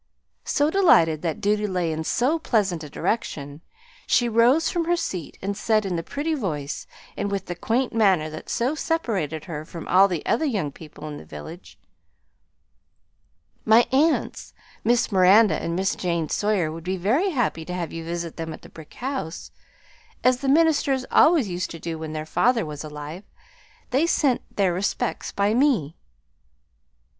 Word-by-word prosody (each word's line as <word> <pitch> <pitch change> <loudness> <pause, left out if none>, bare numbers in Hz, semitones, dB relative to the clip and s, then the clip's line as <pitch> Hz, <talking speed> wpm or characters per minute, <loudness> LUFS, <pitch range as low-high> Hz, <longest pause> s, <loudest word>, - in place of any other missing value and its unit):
So, 295 +1 +1
delighted 165 - +4
that 165 -3 -3
duty 210 +1 +1
lay 180 -4 -1
in 160 0 -3
so 265 - +1
pleasant 195 - 0
a 150 - -8
direction, 145 -5 -3 0.5
she 240 - +3
rose 240 +8 +4
from 340 -1 -1
her 345 +1 +2
seat 180 - -5
and 200 +1 -2
said 215 0 +1
in 185 -2 -2
the 165 - -1
pretty 290 - -3
voice 155 - -4 0.3
and 205 - -2
with 200 -1 -3
the 175 - -4
quaint 235 +8 -1
manner 195 -8 +3
that 155 - -9
so 250 +5 0
separated 205 - -2
her 155 -3 -5
from 165 +1 -9
all 190 +2 +6
the 175 -5 -4
other - - +1
young 205 - -1
people 155 0 -11
in 150 -1 -6
the - - -10
village, 75 - -10 1.9
"My 225 +2 +5
aunts, 300 +5 +1 0.3
Miss 240 0 +2
Miranda 190 -1 +5
and 170 0 -2
Miss 190 +2 0
Jane 170 -3 -2
Sawyer, 205 -7 0
would 165 +1 -8
be 185 +2 -2
very 245 - +1
happy 245 - -1
to 180 - -6
have 175 -2 -4
you 165 - -5
visit 170 0 -5
them 165 -1 -4
at - - -12
the - - -12
brick 160 -2 -14
house, 255 - -5 0.7
as 255 0 +4
the 270 +1 -2
ministers 285 -4 +3
always 310 -8 +5
used 180 -1 -3
to 165 - -8
do 165 0 -5
when 160 -1 -6
their 155 0 -4
father 230 +6 +2
was 150 -1 -6
alive. 150 +4 -8 0.7
They 280 +6 +2
sent 280 -7 +2 0.2
their 190 -3 +2
respects 205 +6 -2
by 200 +1 +1
me." 235 - +2
195 Hz, 170 wpm, -24 LUFS, 165-250 Hz, 1.9 s, all